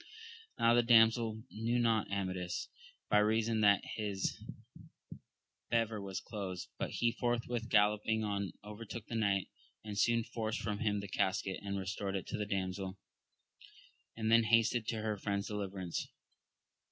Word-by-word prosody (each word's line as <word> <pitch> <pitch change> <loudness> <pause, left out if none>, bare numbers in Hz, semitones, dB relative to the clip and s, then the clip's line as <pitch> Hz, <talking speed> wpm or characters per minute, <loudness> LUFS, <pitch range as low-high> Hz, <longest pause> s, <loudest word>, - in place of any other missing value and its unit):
Now 115 0 +5
the 120 - +6
damsel 115 -1 +4
knew 115 +3 0
not 115 -4 +2
Amadis, 95 -2 -2 0.4
by 105 - +6
reason 110 +1 +2
that 100 -1 +5
his 100 -3 -1 1.3
bever 115 -2 +1
was 95 -2 -4
closed. 95 -5 -5
But - - -1
he 120 - +1
forthwith 120 -1 -1
galloping 105 +1 +3
on 100 -3 -2
overtook 105 +2 -7
the - - -8
knight, 100 -4 +1 0.3
and 105 -1 -6
soon 115 +2 +3
forced 115 -1 -3
from 105 -2 -3
him 105 -2 0
the 100 - -6
casket, 95 0 0
and 100 -1 -3
restored 95 0 -3
it 95 - -3
to - - -2
the 105 - -2
damsel, 95 -1 -2 1.2
and 110 0 0
then 115 0 +6
hastened 115 0 +3
to 110 -2 -2
her 110 -1 -1
friend's 100 -1 -2
deliverance. 95 -4 -3
105 Hz, 145 wpm, -34 LUFS, 100-115 Hz, 1.3 s, the